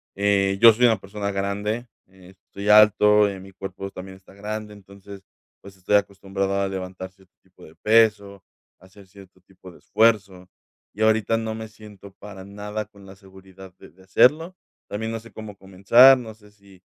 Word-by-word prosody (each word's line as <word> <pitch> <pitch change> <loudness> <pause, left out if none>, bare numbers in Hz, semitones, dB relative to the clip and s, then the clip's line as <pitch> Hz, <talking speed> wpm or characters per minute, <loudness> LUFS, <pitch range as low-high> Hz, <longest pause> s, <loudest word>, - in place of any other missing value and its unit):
Eh, 100 -1 0
yo 115 -1 +8
soy 120 +3 +2
una 115 -2 +2
persona 100 +1 -6
grande, 105 +4 -4 0.2
eh, 95 -1 -19
estoy 100 +2 -11
alto, 105 0 +5
eh, 100 -1 -8
mi 95 +1 -14
cuerpo 95 +1 -8
también 95 0 -11
está 95 - -21
grande, 105 +1 -7
entonces, 100 0 -15 0.4
pues, 100 -1 -15
estoy 95 +2 -1
acostumbrado 100 -1 -3
a 100 - -1
levantar 95 -1 -7
cierto 95 -1 -27
tipo 95 -1 -22
de 80 - -18
peso, 105 -3 +1 0.4
a 95 - -20
hacer 95 +1 -19
cierto 95 -1 -18
tipo 90 0 -17
de - - -18
esfuerzo, 100 -4 0 0.4
y 105 - -9
ahorita 110 0 +1
no 110 -1 -5
me 110 0 -8
siento 105 -2 -15
para 100 -2 -11
nada 105 +2 -7
con 100 -1 -19
la 95 0 -14
seguridad 95 -1 -16
de - - -16
de 95 +4 -23
hacerlo. 155 - +2 0.3
También 110 +2 -5
no 115 - -5
sé 115 0 -16
cómo 110 -2 -11
comenzar, 100 +8 +5
no 115 -3 -9
sé 105 -1 -22
si 100 -2 -22
100 Hz, 185 wpm, -22 LUFS, 95-105 Hz, 0.4 s, yo